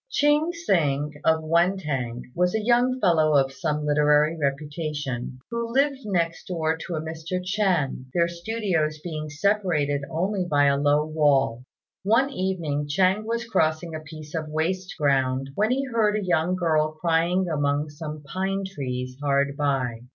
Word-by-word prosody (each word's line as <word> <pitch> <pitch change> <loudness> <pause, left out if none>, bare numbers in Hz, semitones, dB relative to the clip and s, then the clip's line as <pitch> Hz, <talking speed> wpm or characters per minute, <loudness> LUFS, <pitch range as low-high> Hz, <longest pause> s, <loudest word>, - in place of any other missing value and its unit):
Ching 300 -5 +2
Hsing, 150 - 0
of 160 0 +2
Wên 170 +4 +2
têng, 125 -7 -3
was 180 +3 +1
a - - +2
young 245 +2 +3
fellow 160 -7 +3
of 135 -1 +2
some 150 -1 -2
literary 150 +1 +3
reputation, 145 -3 -3
who 235 0 -3
lived 275 +2 +2
next 170 -4 -1
door 160 -3 0
to 165 +2 -6
a 155 - -2
Mr. 160 +3 -4
Ch'ên, 180 -9 0
their 170 +2 +2
studios 170 -4 -1
being 155 -3 -5
separated 155 -4 +1
only 185 +4 -1
by 145 -5 +2
a 140 0 +4
low 145 +1 +2
wall. 145 -6 +2 0.4
One 230 +8 +2
evening 170 - -2
Ch'ên 190 +7 +2
was 235 +1 -2
crossing 160 -6 0
a 155 - -4
piece 155 -1 -11
of 155 -2 -3
waste 180 +5 -2
ground 135 -2 +1
when 210 +8 +1
he 270 +2 0
heard 225 -4 +1
a 210 -2 -2
young 175 0 +1
girl 155 -3 +1
crying 170 +3 +1
among 145 -1 0
some 150 0 -7
pine 190 +6 -2
trees 130 -8 -5
hard 140 -1 +1
by. 135 -5 -1
160 Hz, 160 wpm, -25 LUFS, 145-190 Hz, 0.4 s, a